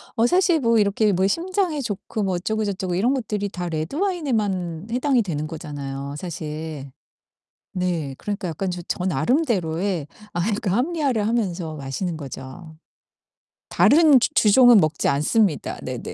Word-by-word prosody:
어 230 +2 +3
사실 360 -1 +3
뭐 230 -3 +3
이렇게 205 +1 +2
뭐 190 +1 +2
심장에 345 - -1
좋고 210 -1 -4
뭐 190 -2 0
어쩌고 220 +4 -1
저쩌고 190 -3 -2
이런 240 +9 +2
것들이 210 -5 -2
다 180 -2 -5
레드와인에만 205 - -2
해당이 255 0 +2
되는 155 -6 -3
거잖아요, 145 -3 -6
사실. 155 -4 -6 0.8
네. 170 -7 -2
그러니까 200 -3 -4
약간 180 +3 -3
저 175 0 -5
저 180 - -2
나름대로의 185 - 0 0.3
아이 175 +6 0
그 215 -4 -3
합리화를 255 - 0
하면서 185 -8 -1
마시는 155 +5 -4
거죠. 145 +3 -9 0.9
다른 300 -4 +6
주 - - +2
주종은 235 +1 +7
먹지 155 -2 +1
않습니다. 160 +5 +1
네네. - - -5
190 Hz, 320 characters per minute, -23 LUFS, 160-235 Hz, 0.9 s, 주종은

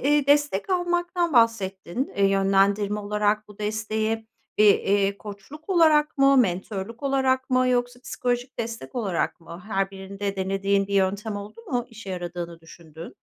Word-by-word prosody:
iii, 290 +1 +2
destek 290 - +2
almaktan 350 -1 0
bahsettin. 230 -1 +1
Eee, 200 - +3
yönlendirme 195 +1 +2
olarak 210 +1 0
bu 210 - -15
desteği 220 +1 -2 0.3
bir, 210 -1 +7
eee, 200 0 +1
koçluk 215 - -11
olarak 315 -5 +3
mı, 275 0 +5
mentörlük 200 +1 -1
olarak 265 -1 +1
mı 255 0 +3
yoksa 245 0 0
psikolojik 245 -1 -3
destek 230 +2 -5
olarak 195 -10 -2
mı? 170 +2 -11
Her 195 -2 -1
birinde 195 +1 -5
denediğin 195 +1 0
bir 200 - -4
yöntem 200 +2 0
oldu 205 - -9
mu 245 -2 -1
işe 225 -4 -10
yaradığını 175 -2 -5
düşündüğün? 165 0 -12
210 Hz, 145 wpm, -25 LUFS, 195-255 Hz, 0.3 s, bir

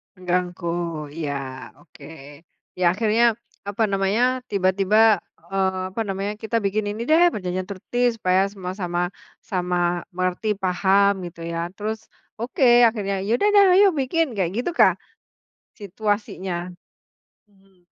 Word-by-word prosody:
Mengganggu, 180 -1 -2 0.5
iya. 155 -3 -3 0.5
Oke. 145 - -18 0.8
Ya 180 - +2
akhirnya, 220 +4 +1 0.4
apa 205 +2 -2
namanya, 215 +6 +1
tiba-tiba, 200 +2 +3 0.3
eee, 190 -1 0
apa 225 - -3
namanya, 195 +1 -3
"Kita 225 +2 -2
bikin 205 0 -1
ini 215 +2 -6
deh 345 +3 +5
perjanjian 185 - -4
tertib 245 +6 0
supaya 185 -2 +2
semua 185 -2 -6
sama 175 -3 -2 0.4
sama 180 -3 -1
mengerti 185 +4 -1
paham," 190 +1 +2
gitu 170 0 -12
ya. 170 +1 -3
Terus, 215 +2 -4 0.4
oke 240 0 +4
akhirnya, 205 -3 -2
"Ya 205 - -3
udah 415 - +3
deh 405 - +8 0.2
ayo 405 - +7
bikin," 280 -1 0
kayak 180 -4 0
gitukah 335 +7 +3 0.9
situasinya? 195 -3 -3 0.7
Hmm. 195 -3 -29
195 Hz, 125 wpm, -23 LUFS, 180-220 Hz, 0.9 s, deh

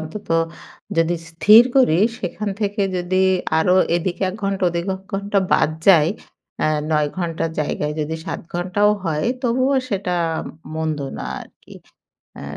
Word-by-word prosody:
অন্তত। 160 +6 -8 0.7
যদি 165 +1 +2 0.2
স্থির 210 +7 +7
করি, 180 -11 +4 0.2
সেখান 205 +3 -4
থেকে 205 0 0
যদি 185 +1 0 0.4
আরো 180 +3 +3 0.2
এদিকে 175 +2 -3
১ - - -9
ঘন্টা 195 -1 -1
ওদিকে 170 +2 -3
১ 190 - -17
ঘন্টা 200 +1 0
বাদ 150 - +3 0.2
যায়। 165 -5 +6 0.5
আ - - +3 0.2
৯ 150 -1 +2
ঘন্টার 165 -2 -2
জায়গায় 150 0 -2
যদি 155 +1 -2
৭ - - -4
ঘণ্টাও 190 +4 +2
হয় 155 0 -1 0.2
তবুও 255 +3 +1
সেটা 195 -4 -2 0.6
মন্দ 160 -1 -2 0.2
না - - -5 0.2
আরকি। - - -15 0.7
আ - - -8
180 Hz, 145 wpm, -20 LUFS, 160-200 Hz, 0.7 s, স্থির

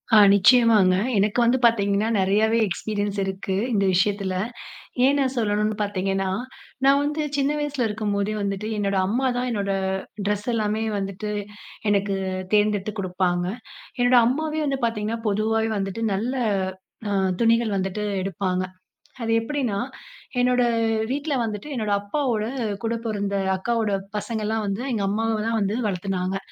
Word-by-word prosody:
ஆ - - +9 0.2
நிச்சயமாங்க. 210 -2 +5 0.2
எனக்கு 205 +4 +2
வந்து 240 +2 +3
பார்த்தீங்கன்னா 205 -2 +2
நெறையவே 210 +4 +3
எக்ஸ்பீரியன்ஸ் 205 +2 -2
இருக்கு. 190 0 -3 0.2
இந்த 200 -2 +2
விஷயத்தில, 195 +1 +1 0.7
ஏன் 285 +1 +3
நான் 265 -1 0
சொல்லணுன்னு 210 -1 +1
பார்த்தீங்கன்னா 195 -1 -1 0.5
நான் 275 +1 +5
வந்து 295 +2 -1 0.2
சின்ன 280 0 +1
வயசில 290 -4 -1
இருக்கும்போதே 210 -1 -1
வந்துட்டு 200 +1 -2
என்னோட 200 -1 0
அம்மாதா 245 +4 0
என்னோட 200 -3 -1 0.5
ட்ரெஸ் 210 0 -1
எல்லாமே 215 0 0 0.2
வந்துட்டு 195 +1 -4 0.6
எனக்கு 200 -1 +1 0.4
தேர்ந்தெடுத்து 210 -1 +2
குடுப்பாங்க. 180 -1 0 0.5
என்னோட 245 +1 +4
அம்மாவே 310 +5 0
வந்து 275 -1 0
பார்த்தீங்கன்னா 225 0 -1
பொதுவாகவே 220 +2 +1
வந்துட்டு 195 +3 -3
நல்ல 230 +7 -1 1.1
துணிகள் 230 -2 +3
வந்துட்டு 195 +2 -2 0.2
எடுப்பாங்க. 185 -1 -1 0.6
அது 225 - -1
எப்படின்னா 240 -5 -1 0.6
என்னோட 250 0 +3 0.5
வீட்டில 290 +2 -1
வந்துட்டு 210 +2 -4
என்னோட 215 -4 -1
அப்பாவோட 225 0 -1 0.4
கூட 225 0 0
பொறந்த 200 -2 -1 0.2
அக்காவோட 225 +1 0 0.3
பசங்கள்லா 220 0 -2
வந்து 200 +3 -2
எங்க 215 -4 -1
அம்மவே 225 +2 0
தான் 230 0 +1
வந்து 200 +1 0
வளர்த்துனாங்க. 190 -1 -1
210 Hz, 125 wpm, -24 LUFS, 200-230 Hz, 1.1 s, ஆ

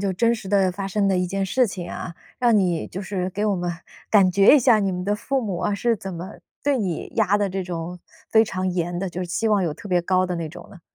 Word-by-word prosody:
就 195 -1 0
真 230 +5 +2
实 205 -4 -8
地 195 -2 +3
发 195 +2 -4
生 200 +1 0
的 190 - +2
一 180 0 +1
件 195 +1 -2
事 250 +5 +2
情 180 -4 -6
啊。 170 - -6 0.2
让 240 -3 +4
你 180 -5 +1
就 185 - -6
是 190 -2 -2
给 205 +3 -2
我 205 - +2
们 175 0 -2 0.4
感 195 -4 +5
觉 195 +7 +6
一 - - +5
下 240 -3 +5
你 195 -2 0
们 180 0 -4
的 205 +2 +1
父 265 +6 -1
母 200 -7 -3
啊， 205 - 0
是 230 +2 +1
怎 190 -1 -7
么 175 +4 -8 0.2
对 280 -2 +2
你 185 -6 -3
压 205 -2 +3
得 200 -1 +1
这 190 0 -3
种 175 0 -5 0.3
非 220 0 +6
常 185 -3 -2
严 175 -1 -2
的， 190 0 -2
就 180 +1 -6
是 180 - -3
期 220 +6 -1
望 205 -3 +3
有 165 - -1
特 200 +6 -10
别 180 -1 +3
高 185 +1 +2
的 180 - -3
那 165 -2 -4
种 160 - -11
呢？ 180 - -14
190 Hz, 295 characters per minute, -23 LUFS, 180-210 Hz, 0.4 s, 觉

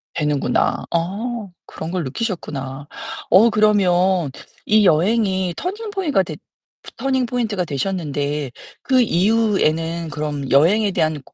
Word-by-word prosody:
되는구나. 150 -5 0
어. 205 +6 -2 0.2
그런 160 +1 -7
걸 180 -2 -1
느끼셨구나. 140 - -4 0.4
어 210 +6 +6
그러면 190 - +2 0.3
이 215 -1 +4
여행이 190 +1 +2
터닝 415 +5 -4
포이가 315 - +1
됐 155 -3 -8 0.6
터닝 260 -1 0
포인트가 230 -6 -1
되셨는데 145 -3 -2 0.3
그 260 -2 +3
이후에는 170 -6 +1
그럼 145 -2 -4
여행에 195 +9 +4
대한 155 -5 0
고 - - -23
185 Hz, 265 characters per minute, -20 LUFS, 155-220 Hz, 0.6 s, 어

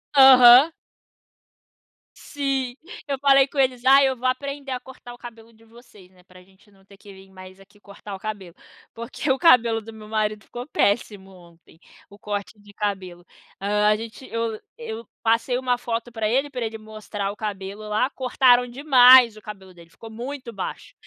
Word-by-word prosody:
Aham. 265 +2 +8 1.4
Sim. 270 -3 -4 0.3
Eu 275 -1 -2
falei 275 -1 +4
com 280 - -14
eles: 255 -2 0
"Ai, 270 +1 +6
eu 260 - -2
vou 255 +1 -3
aprender 275 +1 -4
a 250 - -3
cortar 255 -2 -13
o - - -14
cabelo 230 -1 -13
de 225 0 -24
vocês, 220 -5 -19
né, 180 -1 -24
para 185 0 -18
a 180 - -19
gente 190 +3 -26
não 195 -1 -26
ter 200 - -18
que 200 0 -15
vim 190 0 -17
mais, 185 0 -14
aqui 205 +1 -21
cortar 200 0 -11
o - - -11
cabelo". 195 -5 -8 0.4
Porque, 245 +5 -4
o 265 - +1
cabelo 235 -9 +4
do 225 +1 -12
meu 215 -1 -13
marido 215 -1 -2
ficou 245 +3 -9
péssimo, 200 -5 -1
ontem. 170 -2 -20 0.3
O 200 +1 -17
corte 205 0 -6
de 205 0 -18
cabelo. 185 -4 -5 0.3
Hã, 210 +1 0
a 210 - +4
gente 225 +4 -10
eu 230 -1 -3 0.2
eu 230 -1 -8 0.2
passei 230 +2 +1
uma 250 -1 -1
foto 235 0 -5
pra 220 -2 -3
ele, 270 +4 0
pra 250 -4 -5
ele 225 0 -6
mostrar 215 -2 -6
o - - -11
cabelo, 205 0 -7
lá. 215 +5 0
Cortaram 250 -1 +2
demais 255 -3 +6
o 215 - -14
cabelo 195 -3 -11
dele. 170 -1 -18
Ficou 225 +6 -14
muito 245 +1 -8
baixo. 190 - -7
225 Hz, 190 wpm, -22 LUFS, 205-255 Hz, 1.4 s, Aham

